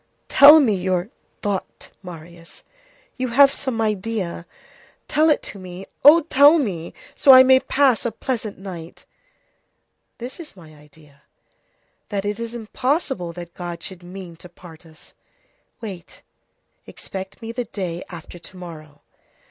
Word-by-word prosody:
"Tell 295 +3 +9
me 250 -8 +3
your 185 +2 -2 0.3
thought, 200 -2 -4
Marius; 170 -2 -12 0.5
you 255 0 -2
have 275 +3 +5
some 260 -4 -3
idea. 210 -5 -3 0.6
Tell 315 +1 +3
it 300 - +2
to 200 - -9
me. 185 +1 -9 0.2
Oh! 310 +4 +8
tell 295 0 +5
me, 185 - -4 0.2
so - - 0
that 265 - +12
I 260 - +9
may 260 0 +6
pass 265 -4 +2
a 235 - -2
pleasant 225 -2 -4
night." 175 -4 -10 1.1
"This 245 +6 -8
is 320 -9 -10
my 160 -3 -15
idea: 150 -1 -21 0.9
that 200 -1 -3
it 205 +1 -3
is 230 0 -6
impossible 240 - -2
that 170 0 -10
God 175 -1 -7
should 185 -2 -9
mean 180 -1 -10
to 180 - -14
part 170 -1 -15
us. 160 0 -20 0.7
Wait; 195 -6 -10 0.6
expect 190 0 -9
me 230 -1 -7
the 245 +1 -4
day 180 -5 -5
after 175 0 -11
to 185 - -13
morrow." 155 -4 -11
195 Hz, 145 wpm, -21 LUFS, 175-245 Hz, 1.1 s, that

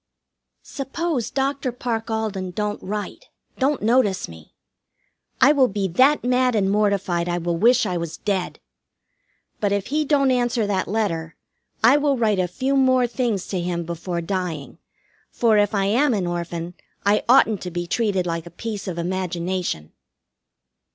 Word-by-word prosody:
Suppose 275 -3 -3
Dr. 275 -1 -1
Parke 235 -2 -3
Alden 215 -4 -2
don't 210 +3 -3
write, 210 - -5 0.3
don't 275 -2 +1
notice 215 -4 +2
me! 80 -2 -14 0.8
I 270 - +7
will 275 -4 +4
be 200 -2 -2
that 265 - +4
mad 250 0 +2
and 195 -2 +2
mortified 200 -4 +1
I 175 - 0
will 170 0 -1
wish 240 +8 +4
I 180 - -1
was 165 -1 -5
dead. 195 -3 -2 1.0
But 205 -2 0
if 200 -1 0
he 305 0 +2
don't 275 -2 +2
answer 245 -2 +1
that 195 -2 -1
letter, 165 -7 -2 0.5
I 245 +6 +7
will 290 -2 +1
write 215 -4 +1
a 180 - +1
few 260 +10 -1
more 260 -2 +4
things 235 -5 -1
to 185 -3 -2
him 170 -1 -2
before 170 +1 -4
dying, 170 -5 -4 0.5
for, 225 -3 +3
if 205 +1 +1
I 195 -1 +1
am 245 +5 +2
an 190 -3 -1
Orphan, 175 0 -4 0.3
I 205 +1 +3
oughtn't 225 -5 +5
to 180 - -4
be 175 0 -4
treated 190 -1 0
like 165 -1 -3
a - - -8
piece 205 +2 -6
of 180 -2 -4
imagination. 175 - -3
205 Hz, 160 wpm, -22 LUFS, 175-245 Hz, 1.0 s, I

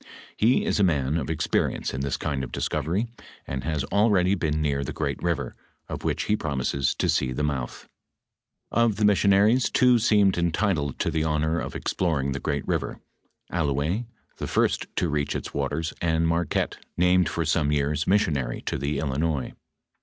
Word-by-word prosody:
He 120 +4 +3
is - - 0
a - - +4
man 75 -5 +1
of 80 -3 -2
experience 75 -1 0
in 65 - -3
this 70 0 -1
kind 70 -3 -2
of 65 - -6
discovery, 95 +8 -1 0.4
and 70 -1 -4
has 75 -3 -1
al 105 +3 +4
ready 95 -2 +3
been 80 -5 0
near 70 -2 0
the - - -5
great - - -3
river, - - -1 0.3
of - - -6
which - - 0
he 105 - +1
promises 70 -5 -1
to - - 0
see 65 - +1
the 70 +4 -2
mouth."* 65 -5 -3 0.8
Of 115 -3 +3
the 105 +1 +1
missionaries, 105 +4 +4
two 125 -2 +4
seemed 105 -5 +3
entitled 85 -4 0
to - - 0
the 80 - 0
honor 80 +1 0
of - - -5
exploring 75 -7 -1
the 70 - -2
great 70 -2 -2
river, - - -2 0.5
AUouez, 80 - 0 0.3
the - - -4
first - - +1
to 90 - +1
reach 75 -2 -1
its - - -5
waters, 75 +3 -2
and 80 -1 +2
Marquette 85 -1 0 0.2
named 90 0 +4
for 85 - -2
some 75 -1 +1
years 75 +1 0
missionary 75 - +1
to - - -3
the 70 +2 -1
Il 80 - -1
linois. 75 0 -1
80 Hz, 180 wpm, -25 LUFS, 70-95 Hz, 0.8 s, a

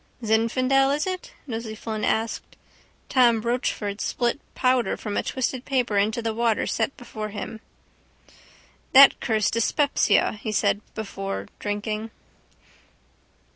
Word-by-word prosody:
—Zinfandel 255 +5 +2
is 300 - -1
it? 370 -1 -4
Nosey 225 -4 -5
Flynn 215 -1 -5
asked. 225 +2 -1 0.5
Tom 240 -3 +4
Rochford 220 -3 -2
spilt 240 +2 0 0.2
powder 255 -1 +2
from 210 -2 -5
a - - +1
twisted 260 -1 -2
paper 250 -6 0
into 220 +3 0
the 225 -1 -1
water 230 -1 +1
set 225 +4 -1
before 215 -3 -6
him. 220 +1 -6 1.3
—That 275 +1 +9
cursed 220 -3 +1
dyspepsia, 230 -3 +2
he 215 - -3
said 210 0 +1
before 195 -2 -5
drinking. 215 +1 -3
225 Hz, 120 wpm, -24 LUFS, 215-255 Hz, 1.3 s, That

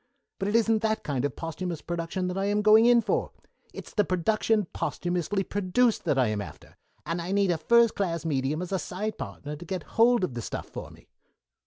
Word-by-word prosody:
But 195 - -1
it 205 - 0
isn't 225 -1 +3
that 220 -1 0
kind 140 -2 -1
of 145 - -3
posthumous 165 0 -5
production 170 +2 -3
that 180 - -3
I 195 - 0
am 205 +1 +1
going 215 +2 +7
in 240 -1 +6
for. - - -1 0.4
It's - - -10
the 210 - +3
production 210 +3 +1
posthumously 180 +3 -1
produced 205 +5 +1
that 135 - +1
I 125 -4 +3
am 105 -1 -2
after, - - -11 0.3
and 170 +1 -2
I 175 +2 -4
need 200 -2 +2
a 170 - 0
first 235 +7 +4
class 170 -5 -2
medium 145 +2 -1
as 180 - -7
a 190 - 0
side 210 +6 -4
partner 150 +1 -6
to 155 - -10
get 180 -1 -4 0.2
hold 240 -2 +5
of 160 - -1
the 120 - -4
stuff - - -5
for - - -8
me." - - -18
185 Hz, 215 wpm, -27 LUFS, 165-215 Hz, 0.4 s, going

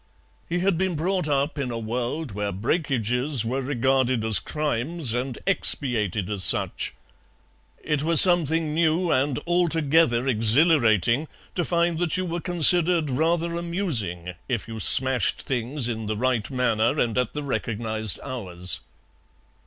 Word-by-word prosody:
He 175 +1 -2
had 190 -3 0
been 190 -2 -1
brought 180 +2 -2
up 145 +1 -1
in 135 -3 -3
a 120 - -5
world 120 +6 -4
where 100 0 -4
breakages 125 - -2
were 130 +4 -3
regarded 130 -2 -1
as 110 -2 +3
crimes 150 -1 -2
and 125 +1 -4
expiated 110 - +1
as 100 -2 -2
such; - - +4 0.9
it 150 -2 -2
was 165 +1 +4
something 165 -4 +5
new 165 +2 0
and 135 0 0
altogether 160 -7 +1
exhilarating 120 - +2 0.3
to 175 - -2
find 170 -1 -1
that 175 -2 -1
you 185 - -2
were 170 0 -4
considered 175 -2 +4
rather 165 +5 -1
amusing 135 - -2 0.2
if 120 -5 -3
you 115 -1 -8
smashed 130 0 +3
things 130 0 -2
in 110 -2 -5
the 105 0 -3
right 125 -2 -1
manner 120 -4 0
and 115 -2 -1
at 125 -2 -2
the 150 - -5
recognized 110 -5 -2
hours. 90 -9 -2
135 Hz, 140 wpm, -23 LUFS, 115-165 Hz, 0.9 s, something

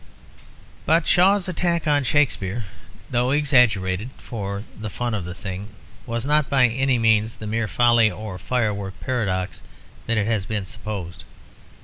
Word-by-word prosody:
But 165 +2 +4
Shaw's 190 +2 +4
attack 175 -1 0
on 145 -2 +3
Shakespeare, 120 -6 +1 0.5
though 120 +1 +1
exaggerated 120 -8 +2
for 100 -3 -5
the 110 0 -6
fun 120 +2 -3
of 100 -5 -3
the 90 +1 -6
thing, 95 0 -6 0.4
was 115 +1 -2
not 150 0 +2
by 130 -3 +4
any 130 +2 +1
means 110 -1 +2
the 110 - -9
mere 115 +1 -1
folly 120 -1 +4
or 105 -3 -7
firework 100 -2 -2
paradox 100 -7 -2 0.5
that 115 -1 +1
has 105 -2 0
been 105 -3 -2
supposed. 100 -4 -6
115 Hz, 140 wpm, -23 LUFS, 100-130 Hz, 0.5 s, But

